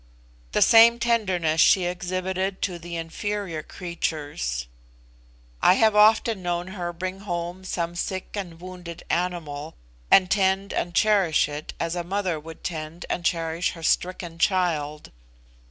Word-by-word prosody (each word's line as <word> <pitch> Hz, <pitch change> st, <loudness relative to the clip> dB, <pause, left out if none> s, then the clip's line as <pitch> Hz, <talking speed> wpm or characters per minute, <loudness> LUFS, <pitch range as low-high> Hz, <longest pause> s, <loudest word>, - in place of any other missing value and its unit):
The -, -, +5 dB
same 230 Hz, 0 st, +7 dB
tenderness 190 Hz, -10 st, +1 dB
she 185 Hz, 0 st, +5 dB
exhibited 185 Hz, +2 st, -2 dB
to 180 Hz, -3 st, -2 dB
the 170 Hz, 0 st, -7 dB
inferior 170 Hz, +1 st, -3 dB
creatures. 145 Hz, -, -4 dB, 1.0 s
I 180 Hz, -, +7 dB
have 220 Hz, 0 st, +4 dB
often 215 Hz, 0 st, +5 dB
known 175 Hz, 0 st, -2 dB
her 180 Hz, -3 st, -4 dB
bring 185 Hz, +2 st, -5 dB
home 175 Hz, -1 st, -4 dB
some 170 Hz, -2 st, -3 dB
sick 185 Hz, +1 st, -4 dB
and 175 Hz, -5 st, -6 dB
wounded 180 Hz, -2 st, -9 dB
animal, 165 Hz, -4 st, -2 dB, 0.3 s
and 185 Hz, -2 st, +6 dB
tend 195 Hz, -1 st, +1 dB
and 175 Hz, 0 st, -2 dB
cherish 195 Hz, -9 st, +3 dB
it 150 Hz, +1 st, -7 dB
as 165 Hz, +1 st, -2 dB
a 175 Hz, -, -2 dB
mother 185 Hz, -2 st, -1 dB
would 160 Hz, +1 st, -11 dB
tend 160 Hz, 0 st, -5 dB
and 175 Hz, -, -2 dB
cherish 165 Hz, 0 st, 0 dB
her 165 Hz, -2 st, -11 dB
stricken 175 Hz, -1 st, -1 dB
child. 160 Hz, -6 st, 0 dB
175 Hz, 140 wpm, -25 LUFS, 165-190 Hz, 1.0 s, same